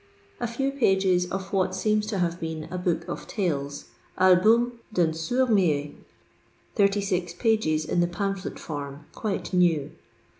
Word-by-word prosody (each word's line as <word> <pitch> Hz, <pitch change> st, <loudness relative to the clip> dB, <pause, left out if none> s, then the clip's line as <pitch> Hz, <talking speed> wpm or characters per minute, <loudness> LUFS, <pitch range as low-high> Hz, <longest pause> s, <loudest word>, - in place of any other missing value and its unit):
A 240 Hz, -, -1 dB
few 270 Hz, +4 st, -1 dB
pages 190 Hz, -8 st, +2 dB
of 195 Hz, +1 st, -5 dB
what 185 Hz, -1 st, +1 dB
seems 210 Hz, +2 st, +1 dB
to 215 Hz, -2 st, -2 dB
have 175 Hz, -1 st, -1 dB
been 160 Hz, -2 st, -4 dB
a 180 Hz, -, -3 dB
book 170 Hz, -2 st, -1 dB
of -, -, -6 dB
tales: 145 Hz, -8 st, -3 dB, 0.3 s
"Album 220 Hz, +6 st, +4 dB
d'un 175 Hz, -6 st, +2 dB
Sonrd 245 Hz, +11 st, 0 dB
Muet" 150 Hz, -8 st, +2 dB, 0.8 s
(36 195 Hz, -4 st, +1 dB
pagei 165 Hz, -9 st, +1 dB
in -, -, 0 dB
the 175 Hz, -, +3 dB
pamphlet 195 Hz, +1 st, -3 dB
form, 145 Hz, -1 st, -6 dB
quite 205 Hz, -3 st, -3 dB
new). 170 Hz, -6 st, +2 dB
185 Hz, 145 wpm, -26 LUFS, 165-210 Hz, 0.8 s, Album